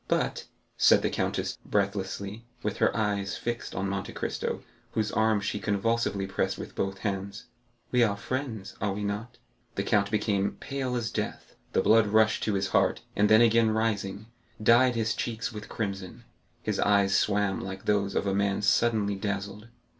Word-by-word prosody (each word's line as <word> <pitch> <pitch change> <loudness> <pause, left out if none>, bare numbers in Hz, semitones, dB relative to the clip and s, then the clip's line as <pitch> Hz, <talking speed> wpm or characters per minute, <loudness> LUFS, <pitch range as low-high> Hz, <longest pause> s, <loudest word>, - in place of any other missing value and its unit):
"But," - - -1 0.3
said - - +5
the - - +1
countess, - - -2
breathlessly, 100 +2 -2 0.2
with 105 - -2
her - - +2
eyes 100 -2 -1
fixed 120 0 -4
on 95 +2 -1
Monte 100 0 -3
Cristo, - - -3 0.3
whose 110 -2 0
arm 110 -1 +2
she 105 +1 -2
convulsively 100 -1 0
pressed 95 - -1
with - - -7
both 95 0 -2
hands, 100 +3 -3 0.5
"we 125 - +3
are 105 -4 +3
friends, 115 -5 -4
are 100 -2 0
we 105 +1 -4
not?" 105 +4 -4 0.4
The 100 - -1
count 100 -1 +2
became 100 -2 0
pale 135 -2 -3
as 115 -2 -2
death, - - -4 0.2
the - - +2
blood 110 -1 +5
rushed 110 +1 +3
to 105 - +1
his 95 0 0
heart, - - +2
and 105 0 +3
then 110 +1 +7
again 115 -1 +5
rising, 110 -2 -1 0.3
dyed 120 +3 +5
his 115 -2 +1
cheeks 115 +2 -3
with 105 0 -8
crimson; 100 +2 -4 0.4
his - - -1
eyes 100 -2 +3
swam 100 -1 +2
like 95 0 -7
those 100 -1 +1
of - - +1
a 100 - +1
man 100 0 +1
suddenly 105 -1 +3
dazzled. 100 +2 -4
105 Hz, 170 wpm, -28 LUFS, 100-115 Hz, 0.5 s, then